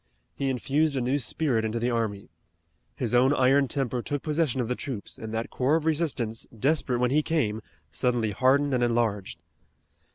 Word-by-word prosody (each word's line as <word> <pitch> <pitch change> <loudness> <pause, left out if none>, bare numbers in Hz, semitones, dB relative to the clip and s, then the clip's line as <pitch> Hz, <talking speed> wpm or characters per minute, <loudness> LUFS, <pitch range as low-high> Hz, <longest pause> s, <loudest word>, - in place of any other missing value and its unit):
He 135 -1 -2
infused 140 +4 +1
a - - +1
new 130 +4 +1
spirit 125 -1 0
into 110 +1 -2
the 120 +2 0
army. 105 -7 -2 0.6
His 120 -3 -2
own 130 +4 +4
iron 135 +1 +4
temper 130 -2 -1
took 145 +3 -4
possession 150 -4 0
of 120 - 0
the 125 - 0
troops, 125 -4 -7
and 110 -1 -6
that 115 +1 -3
core 135 +4 +2
of 160 -1 -1
resistance, 145 -9 -1
desperate 135 0 +1
when 125 +1 +1
he 150 +2 +4
came, 120 -10 -1 0.3
suddenly 120 - 0
hardened 135 +6 +2
and 125 -1 +2
enlarged. 110 -7 -1
125 Hz, 175 wpm, -27 LUFS, 115-140 Hz, 0.6 s, own